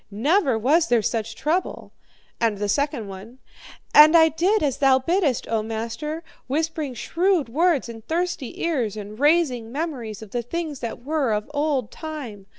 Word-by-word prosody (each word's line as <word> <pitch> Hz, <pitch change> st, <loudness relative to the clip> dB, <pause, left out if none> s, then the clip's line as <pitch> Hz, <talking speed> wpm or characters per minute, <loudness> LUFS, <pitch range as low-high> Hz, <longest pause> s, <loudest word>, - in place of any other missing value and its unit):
Never 265 Hz, -, +2 dB
was 305 Hz, +9 st, +3 dB
there 235 Hz, -3 st, +2 dB
such 225 Hz, +1 st, -2 dB
a -, -, -20 dB
trouble.' 330 Hz, +6 st, -2 dB, 0.5 s
"And 225 Hz, -3 st, +1 dB
the 205 Hz, +1 st, -2 dB
second 280 Hz, -1 st, -1 dB
one: 200 Hz, +6 st, -10 dB, 0.6 s
'And 310 Hz, +3 st, +9 dB
I 320 Hz, 0 st, +6 dB
did 360 Hz, +6 st, +1 dB
as 280 Hz, -3 st, 0 dB
thou 270 Hz, -2 st, +5 dB
biddest, 300 Hz, -1 st, 0 dB
O 225 Hz, -1 st, 0 dB
master, 230 Hz, +9 st, -4 dB, 0.2 s
whispering 305 Hz, -1 st, -2 dB
shrewd 345 Hz, -, +1 dB
words 315 Hz, +1 st, +2 dB
in 230 Hz, -1 st, -9 dB
thirsty 335 Hz, -2 st, -3 dB
ears, 250 Hz, -, -1 dB
and 210 Hz, +1 st, -8 dB
raising 285 Hz, -7 st, +2 dB
memories 255 Hz, -, -4 dB
of 210 Hz, -, -13 dB
the 240 Hz, -, -1 dB
things 305 Hz, +3 st, -4 dB
that 235 Hz, 0 st, -6 dB
were 290 Hz, -6 st, 0 dB
of 210 Hz, +6 st, -3 dB
old 285 Hz, -6 st, 0 dB
time. 265 Hz, -11 st, -7 dB
270 Hz, 165 wpm, -23 LUFS, 225-320 Hz, 0.6 s, And